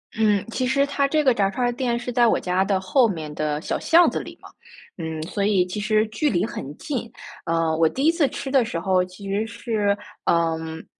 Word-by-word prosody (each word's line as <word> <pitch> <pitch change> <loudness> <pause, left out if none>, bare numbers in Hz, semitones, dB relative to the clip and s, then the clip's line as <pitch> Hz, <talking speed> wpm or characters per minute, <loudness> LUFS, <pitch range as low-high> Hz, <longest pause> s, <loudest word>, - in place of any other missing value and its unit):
嗯， 210 -3 +2
其 255 +2 -1
实 275 +2 +2
它 280 0 0
这 305 +2 +1
个 260 -3 +4
炸 195 -3 +1
串 245 +5 -1
儿 - - +1
店 240 -1 -1
是 240 +1 -5
在 240 0 +4
我 - - +2
家 180 +1 +1
的 195 -1 0
后 235 +6 +3
面 160 -7 -5
的 150 -1 -2
小 - - -2
巷 340 +2 +5
子 - - -3
里 - - -9
嘛。 - - -13 0.5
嗯， 160 -1 -4
所 200 +4 -3
以 195 -3 +3
其 180 +3 -5
实 215 +1 +2
距 290 +8 0
离 185 -2 +1
很 145 -8 -7
近， 245 -6 -4 0.4
呃， 165 -1 +1
我 160 0 +3
第 270 +3 -2
1 325 - +6
次 330 -5 +2
吃 265 - -6
的 265 -2 +4
时 220 -7 -4
候 185 0 +2
其 185 +2 -10
实 205 +3 -1
是， 210 -2 -1 0.3
嗯， 160 -1 0
205 Hz, 240 characters per minute, -23 LUFS, 175-245 Hz, 0.5 s, 1